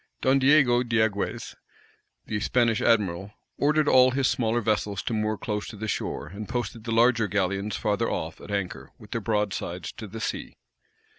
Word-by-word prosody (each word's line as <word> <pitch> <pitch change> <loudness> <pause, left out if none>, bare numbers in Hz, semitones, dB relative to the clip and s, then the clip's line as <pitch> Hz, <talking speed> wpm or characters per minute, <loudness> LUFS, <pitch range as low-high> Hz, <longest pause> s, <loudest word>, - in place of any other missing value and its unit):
Don 135 +1 +3
Diego 135 -3 +5
Diagues, 110 -4 -1 0.7
the 105 - -2
Spanish 115 +1 +2
admiral, 100 -3 +1 0.3
ordered 150 +1 +2
all 130 -1 +6
his 130 0 +1
smaller 115 -1 +1
vessels 105 -3 -1
to - - -2
moor 110 0 0
close 105 -1 -3
to - - -8
the 110 +1 -5
shore, 105 - -3
and 100 +7 -8
posted 120 -2 -4
the 115 - -3
larger 115 -1 +4
galleons 100 +1 -1
farther 110 +2 0
off, 80 0 -4
at - - -11
anchor, 100 -3 -3
with - - -15
their - - -2
broadsides 105 -4 -2
to 110 -3 -9
the 115 +3 -8
sea. - - -4
110 Hz, 170 wpm, -26 LUFS, 100-120 Hz, 0.7 s, all